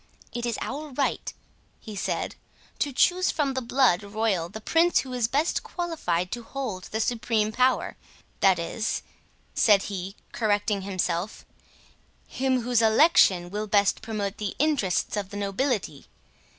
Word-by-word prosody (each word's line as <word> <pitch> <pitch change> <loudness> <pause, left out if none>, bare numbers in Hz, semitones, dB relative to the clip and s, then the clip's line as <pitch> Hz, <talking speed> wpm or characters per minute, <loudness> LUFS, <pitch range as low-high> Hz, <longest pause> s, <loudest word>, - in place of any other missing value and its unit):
It 240 0 -2
is 235 - -1
our 295 +3 -5
right," 275 +1 -1 0.5
he 215 -2 -9
said, 195 - -2 0.4
"to 290 - 0
choose 360 +7 +3
from 285 -3 0
the 260 - -2
blood 240 -6 +3
royal 200 -4 -1
the 215 - -7
prince 330 +10 +3
who 260 -1 -8
is 245 -3 +1
best 290 +7 +1
qualified 185 - -2
to 240 - -4
hold 230 -7 -5
the 220 - -4
supreme 225 -2 0
power—that 220 -5 0
is," 195 +7 -2 0.5
said 205 -3 +4
he, 190 +1 -5 0.2
correcting 205 -2 0
himself, 185 0 -2 0.8
"him 260 -1 0
whose 240 0 +2
election 220 - +5
will 210 +1 -3
best 200 -1 +2
promote 210 -3 -3
the 205 -2 -3
interests 280 - +1
of 200 -2 -3
the 205 - -7
nobility. 200 - -2
220 Hz, 140 wpm, -26 LUFS, 195-260 Hz, 0.8 s, election